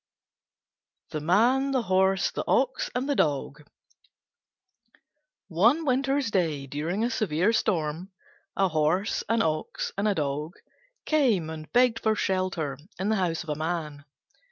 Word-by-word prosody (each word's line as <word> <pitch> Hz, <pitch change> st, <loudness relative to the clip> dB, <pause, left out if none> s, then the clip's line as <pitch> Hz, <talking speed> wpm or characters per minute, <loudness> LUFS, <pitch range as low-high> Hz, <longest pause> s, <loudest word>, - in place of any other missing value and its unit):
THE 155 Hz, -, -3 dB
MAN, 235 Hz, -, +3 dB
THE 255 Hz, -3 st, +1 dB
HORSE, 190 Hz, -1 st, +2 dB
THE -, -, -3 dB
OX, 260 Hz, 0 st, +1 dB
AND 255 Hz, +2 st, -1 dB
THE 290 Hz, -, +1 dB
DOG 145 Hz, -, -1 dB, 1.8 s
One 230 Hz, -, +3 dB
winter's 270 Hz, -1 st, +1 dB
day, 160 Hz, -8 st, 0 dB
during 155 Hz, -, -2 dB
a 240 Hz, -, 0 dB
severe 195 Hz, -1 st, +1 dB
storm, 175 Hz, -3 st, -1 dB, 0.5 s
a 195 Hz, -, +3 dB
Horse, 160 Hz, +5 st, 0 dB
an 230 Hz, 0 st, +2 dB
Ox, 155 Hz, -1 st, -2 dB
and 200 Hz, +2 st, 0 dB
a 205 Hz, -, +1 dB
Dog 150 Hz, +2 st, -3 dB, 0.5 s
came 230 Hz, -, +2 dB
and 155 Hz, -1 st, -9 dB
begged 245 Hz, -2 st, +3 dB
for 220 Hz, 0 st, +1 dB
shelter 185 Hz, -9 st, -1 dB, 0.2 s
in 195 Hz, +2 st, -1 dB
the 220 Hz, -, +2 dB
house 175 Hz, -4 st, -1 dB
of 165 Hz, -, -12 dB
a 150 Hz, -, -1 dB
Man. 155 Hz, -2 st, -4 dB
185 Hz, 140 wpm, -27 LUFS, 155-230 Hz, 1.8 s, MAN